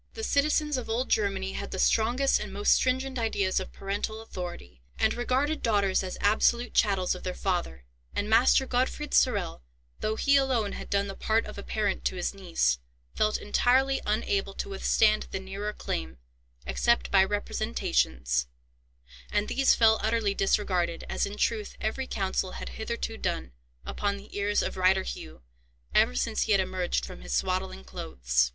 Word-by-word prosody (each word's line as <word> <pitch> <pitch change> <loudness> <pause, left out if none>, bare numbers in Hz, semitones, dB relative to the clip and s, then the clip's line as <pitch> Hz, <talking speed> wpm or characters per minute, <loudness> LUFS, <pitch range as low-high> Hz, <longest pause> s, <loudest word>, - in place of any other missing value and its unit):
The 445 - -5
citizens 300 -2 +2
of 250 - -5
old 240 +4 -1
Germany 195 -2 0
had - - -5
the - - -5
strongest 240 +7 +3
and - - -6
most 205 +1 +3
stringent 260 0 0
ideas 200 -5 +1
of 190 - -7
parental 205 +2 -3
authority, 175 - -8 0.2
and - - +2
regarded 265 +5 0
daughters 200 -4 +2
as 185 -1 -5
absolute 235 +3 +2
chattels 195 -4 +2
of 180 - -8
their 185 - -4
father; 175 - -2 0.3
and 205 - -1
Master 235 +4 +5
Gottfried 260 +4 -1
Sorel, 200 - +2 0.4
though 215 0 -1
he 280 +5 +4
alone 255 -6 +1
had - - -7
done 200 0 +1
the 195 - -5
part 220 +3 0
of - - -8
a - - -4
parent 205 -1 -1
to - - 0
his 180 - -2
niece, 175 - 0 0.3
felt 215 0 +1
entirely 265 +5 +2
unable 200 -2 -1
to - - -4
withstand 215 +2 +2
the - - -3
nearer 195 +2 -4
claim, 65 - -4 0.5
except 235 0 +1
by 195 -1 +6
representations; 65 - 0 0.8
and 205 0 +1
these 270 0 +4
fell 220 -1 +5
utterly 220 -2 +1
disregarded, 185 -4 0
as - - 0
in 205 +1 -7
truth 215 -2 -1
every 240 +5 -2
counsel 190 -1 -1
had - - -6
hitherto 225 0 -4
done, 65 - -3 0.3
upon 200 -1 -2
the 200 - -13
ears 205 0 +1
of - - -4
Reiter 190 +1 +3
Hugh, 80 - -8 0.5
ever 60 - +4
since 65 0 0
he - - +2
had - - +4
emerged 60 0 -1
from - - -10
his - - -3
swaddling 65 0 -1
clothes. 60 0 0
205 Hz, 170 wpm, -28 LUFS, 185-230 Hz, 0.8 s, by